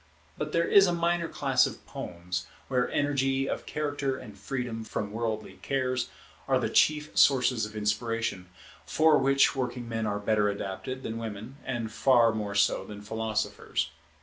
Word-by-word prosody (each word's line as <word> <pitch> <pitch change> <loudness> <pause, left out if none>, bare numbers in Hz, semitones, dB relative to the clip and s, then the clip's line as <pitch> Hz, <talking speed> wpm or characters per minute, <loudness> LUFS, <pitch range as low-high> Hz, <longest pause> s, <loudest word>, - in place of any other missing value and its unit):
But 150 0 -4
there 170 +1 +2
is 195 -1 +7
a 175 - +1
minor 170 0 +1
class 135 -5 +2
of - - -9
poems, 90 +1 -5 0.2
where 125 -2 +1
energy 135 -2 +1
of - - -4
character 145 -3 -2
and 105 -7 -10
freedom 115 +2 -4
from 105 -2 -4
worldly 110 -1 -3
cares 130 -2 -1 0.4
are - - +3
the - - -1
chief 150 0 +3
sources 125 -5 +4
of 105 - -13
inspiration, 105 -3 -1 0.3
for 155 -1 +4
which 135 -1 +4
working 125 -2 -3
men 115 -1 -2
are 105 0 -1
better 105 0 +2
adapted 100 +6 -5
than 115 0 -4
women, 115 +4 -7
and 120 -4 -3
far 120 -1 +4
more 105 -2 -3
so 100 - +3
than 105 -1 -9
philosophers. 110 -7 -2
120 Hz, 160 wpm, -28 LUFS, 105-135 Hz, 0.4 s, is